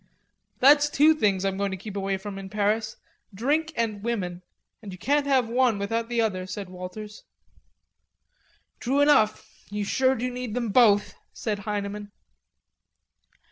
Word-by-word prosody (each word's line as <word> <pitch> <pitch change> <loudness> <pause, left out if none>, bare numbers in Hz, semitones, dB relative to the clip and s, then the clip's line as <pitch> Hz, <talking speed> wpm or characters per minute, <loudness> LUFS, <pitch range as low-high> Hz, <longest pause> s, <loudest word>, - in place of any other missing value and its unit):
"That's 290 +2 +6
two 300 +2 +5
things 200 -9 +1
I'm 195 -1 -1
going 200 0 0
to 190 - -4
keep 200 +2 -9
away 195 -1 -1
from 195 0 -7
in 190 0 -8
Paris; 215 +2 -1 0.3
drink 290 +10 0
and 220 -3 -2
women.... 190 -6 -3 0.4
And 205 -3 -8
you 185 - -9
can't 285 +8 +1
have 260 -4 +3
one 240 -2 +2
without 225 +3 -2
the 240 -1 -1
other," 185 -4 -1
said 195 -1 -6
Walters. 185 +4 -8 1.6
"True 270 +4 +1
enough.... 220 -8 +3 0.2
You 205 0 -3
sure 260 +5 +2
do 250 +1 -3
need 245 -3 -5
them 240 -3 -1
both," 205 -2 +4 0.2
said 210 -3 -3
Heineman. 205 0 -4
215 Hz, 150 wpm, -26 LUFS, 200-250 Hz, 1.6 s, That's